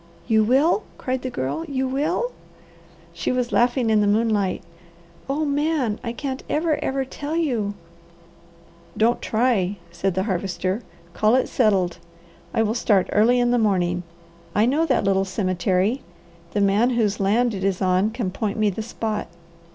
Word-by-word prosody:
"You 220 -2 +4
will?" 275 - +3 0.2
cried 255 0 -2
the 255 - -3
Girl. 135 - -3
"You 265 -2 -1
will?" 315 - -1 0.8
She - - -2
was 250 -1 -1
laughing 240 -1 +2
in 215 -1 +4
the 205 - +2
moonlight. 205 -3 +1 0.7
"Oh 300 +3 0
Man, 285 -6 0
I 230 - -2
can't 265 +2 -4
ever, 310 -1 0
ever 265 0 -1
tell 290 +4 -5
you!" 235 -11 0 1.2
"Don't 230 +2 +2
try," 215 -5 +1
said 175 +2 -1
the 190 - +1
Harvester. 190 +1 -2 0.3
"Call 215 +3 +3
it 260 - +2
settled. 190 -7 +1 0.5
I 225 - +2
will 215 0 0
start 205 -5 +2
early 235 +4 +4
in 245 0 +2
the 245 - +3
morning. 180 -5 +1 0.5
I 210 +3 +4
know 300 +7 +2
that 260 -5 +2
little 195 -1 +2
cemetery. 185 +4 0 0.5
The 205 - +1
man 200 +5 +3
whose 210 -3 +1
land 225 +5 +2
it 190 -2 -4
is 195 -2 0
on 185 +2 +2
can 220 -4 -3
point 210 +2 -3
me 215 -1 +2
the 210 - -5
spot. 220 -1 -3
220 Hz, 160 wpm, -23 LUFS, 195-255 Hz, 1.2 s, You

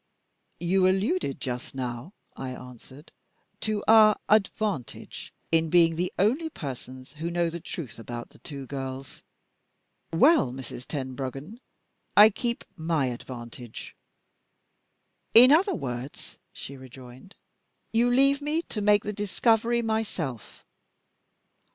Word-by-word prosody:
"You 185 +2 +3
alluded 185 - 0
just 125 +1 -5
now," 125 +6 -5 0.2
I 130 - -5
answered, 125 +4 -13 0.5
"to 215 -2 -2
our 215 -1 +7
'advantage' 205 - -1 0.2
in 165 0 +3
being 165 -1 +5
the 180 +2 -1
only 260 - +2
persons 130 - -8
who 160 +3 -4
know 170 -1 0
the 170 - -5
truth 140 -9 -7
about 120 +1 -7
the - - -19
two 140 -3 -8
girls. 135 0 -6 0.9
Well, 270 - +4
Mrs. 125 -1 -8
Tenbruggen, 135 - -5 0.6
I 210 +2 +9
keep 235 +3 -3
my 160 -6 0
advantage." 120 -1 -9 1.4
"In 250 +3 +10
other 365 +5 +4
words," 125 - -7
she 140 - -9
rejoined, 130 +6 -13 0.6
"you 235 +2 +3
leave 275 +3 +3
me 305 +3 -1
to 210 - -3
make 205 0 +4
the 210 - -3
discovery 225 +3 +1
myself. 200 - -4
165 Hz, 115 wpm, -27 LUFS, 130-215 Hz, 1.4 s, In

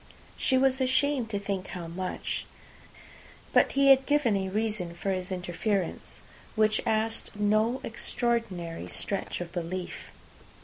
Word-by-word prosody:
She 260 - +2
was 265 0 +3
ashamed 260 -1 +2
to 205 - -1
think 195 -2 -3
how 175 -2 -6
much. 180 +3 -4 1.1
But - - +4
he 275 0 +5
had 265 0 +5
given 290 -7 +3
a 190 -1 -1
reason 210 -4 -1
for 195 +3 -2
his 185 0 -3
interference, 185 +1 -2 0.3
which 215 0 +3
asked 220 0 0
no 215 +4 +2
extraordinary 220 -8 -2
stretch 195 -2 -2
of 170 -1 -5
belief. 180 +1 -5
210 Hz, 130 wpm, -28 LUFS, 185-235 Hz, 1.1 s, he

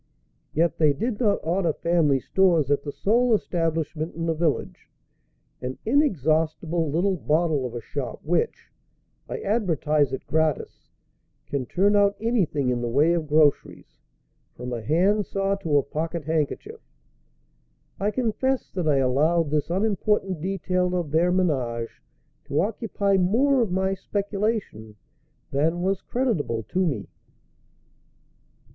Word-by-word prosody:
Yet 165 +2 +1
they 150 -3 +4
did 220 - -3
not 210 -4 +2
order 170 0 +1
family 160 -6 +2
stores 170 -4 +2
at 145 - +2
the 145 - -5
sole 235 - +2
establishment 165 -4 -2
in 165 0 -3
the 165 - +1
village 160 -2 -2 0.7
an 130 +1 -4
inexhaustible 165 - +1
little 180 +5 +1
bottle 155 -4 +1
of 120 - -9
a 120 - -4
shop 130 +2 -5
which, 170 +2 -1 0.6
I - - -3
advertise 155 - +1
it 130 - -5
gratis, 160 -2 -1 0.6
can 135 -3 -3
turn 200 +3 +2
out 200 0 +4
anything 180 - 0
in 120 -1 -1
the 120 - -2
way 150 +8 +3
of 165 -3 -1
groceries, 150 -1 +1 0.6
from 125 0 -6
a 120 - -3
hand 190 - +2
saw 195 0 0
to 160 -7 +1
a 140 - +3
pocket 160 +3 -4
handkerchief. 155 -2 -2 1.2
I 200 +2 +1
confess 255 +3 -1
that 180 -4 -3
I 145 -2 +3
allowed 145 +5 +2
this 150 0 0
unimportant 195 -2 0
detail 180 0 -1
of 170 -5 -2
their 170 +3 +3
ménage 130 -11 -1 0.4
to 145 - -1
occupy 200 -1 0
more 245 +9 +3
of 220 -6 0
my 190 +1 +1
speculation 200 - -3 0.6
than 160 +5 0
was 195 0 0
creditable 175 - -1
to 185 0 +1
me. 115 - -3
165 Hz, 135 wpm, -25 LUFS, 145-195 Hz, 1.2 s, they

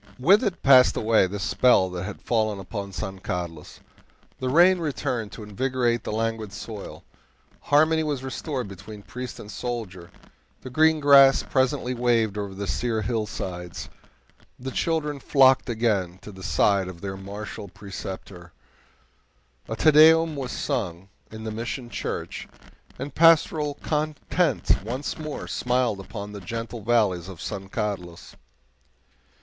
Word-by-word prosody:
With 190 - +5
it 200 -6 -2
passed 130 -2 +6
away 110 -3 +3
the 100 +3 -5
spell 100 0 +3
that 90 -1 -4
had - - -8
fallen 110 -3 0
upon 100 +1 -6
San 95 -1 -5
Carlos. 85 -4 -6 0.6
The 130 - -2
rain 175 +6 +5
returned 125 -8 -2
to 110 - -8
invigorate 120 +2 -1
the - - -4
languid 110 -1 -2
soil, 110 -1 -8 0.6
harmony 155 +2 +3
was 145 -4 -2
restored 130 -1 -4
between 100 +2 -10
priest 125 +1 -7
and 105 - -9
soldier, 105 -8 -5 0.5
the 130 - -9
green 160 +3 +4
grass 140 -1 +7
presently 130 -1 0
waved 115 -4 +1
over 100 -2 -4
the 100 +1 -4
sere 115 0 -1
hillsides, 95 -6 -4 0.7
the 130 +1 -6
children 150 -1 -1
flocked 135 -2 +4
again 105 -6 0
to 105 - -9
the 95 -1 -12
side 100 0 +2
of 90 -2 -9
their 95 -1 -4
martial 100 +1 -7
preceptor, 95 -2 -9 1.2
a 110 - -2
TE 155 +6 +4
DEUM 160 +1 +6
was 135 -3 -4
sung 95 - -3 0.2
in 110 0 -9
the 110 - -4
Mission 120 +2 -5
Church, - - -5 0.5
and 135 +1 -6
pastoral 155 -2 +4
content 155 - 0
once 130 +8 -4
more 155 -2 -5
smiled 125 -4 0
upon 100 +1 -7
the 100 -1 -8
gentle 115 +4 -5
valleys 105 -6 +1
of 95 -4 -10
San 95 0 -6
Carlos. 95 -6 -5
115 Hz, 140 wpm, -25 LUFS, 100-135 Hz, 1.2 s, grass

